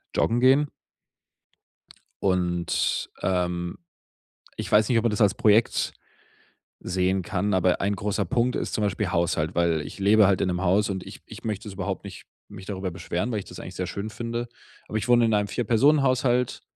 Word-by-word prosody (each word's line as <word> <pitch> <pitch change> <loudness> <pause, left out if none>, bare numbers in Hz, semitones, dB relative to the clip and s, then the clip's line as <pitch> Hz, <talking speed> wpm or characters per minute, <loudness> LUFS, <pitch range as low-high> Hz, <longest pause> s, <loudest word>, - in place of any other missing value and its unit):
joggen 115 +1 +2
gehen?“ 135 +3 +5 1.6
Und, 90 -2 0
ähm, 90 -1 -1 0.8
ich - - -5
weiß 105 0 +5
nicht, 120 - +3
ob 115 - +2
man 120 - +3
das 105 - -2
als 105 -1 +5
Projekt 110 +2 +2 0.9
sehen 95 +1 0
kann, 100 +3 -1
aber 90 -1 +2
ein 100 +1 +1
großer 100 +1 -1
Punkt 125 0 0
ist - - -3
zum 110 - -1
Beispiel 100 -1 -1
Haushalt, 85 -1 0
weil 85 -2 +2
ich 75 - -9
lebe 105 +1 +5
halt 95 -1 +2
in - - +1
'nem 90 0 -2
Haus 100 +3 +2
und 95 -1 -4
ich - - -11
ich - - -11
möchte 105 -1 -3
das 100 - -8
überhaupt 95 -2 -4
nicht - - -10 0.2
mich 95 - -11
darüber 95 -2 -4
beschweren, 90 +5 -3
weil 110 -3 -1
ich - - -10
das 90 - -11
eigentlich 90 - -8
sehr 90 - -2
schön 100 +4 -5
finde. 115 +2 -4 0.4
Aber 110 - -3
ich 110 - -4
wohne 120 -1 +5
in 110 - +2
einem 105 -1 +1
Vierpersonen-Haushalt 125 +1 +2
100 Hz, 185 wpm, -25 LUFS, 90-115 Hz, 1.6 s, gehen